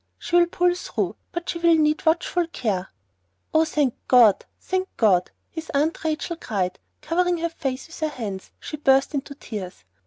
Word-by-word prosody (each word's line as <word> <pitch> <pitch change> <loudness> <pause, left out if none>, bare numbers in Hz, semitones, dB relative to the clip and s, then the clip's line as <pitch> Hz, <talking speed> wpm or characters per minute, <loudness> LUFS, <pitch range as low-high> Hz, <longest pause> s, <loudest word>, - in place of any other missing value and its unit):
She 345 - -3
will 345 0 +6
pull 355 0 +2
through, 360 - -3 0.2
but 345 -1 -5
she 340 - -2
will 335 -1 +5
need 305 0 +1
watchful 340 +1 +2
care." 205 - -2 0.6
"Oh, 315 +1 +5
thank 290 -6 +1
God! 235 -6 +6
Thank 375 0 -1
God!" 185 -5 +3 0.2
his 320 -1 -7
Aunt 305 +4 +1
Rachel 320 +2 -2
cried, 190 - -2
and - - -48
covering 355 +1 +1
her 335 +1 -1
face 270 -5 -4
with 335 - -12
her 310 -1 0
hands, 210 -9 -6
she 300 - -6
burst 270 -1 +3
into 280 0 -4
tears. 190 - -7
305 Hz, 180 wpm, -24 LUFS, 240-335 Hz, 0.6 s, will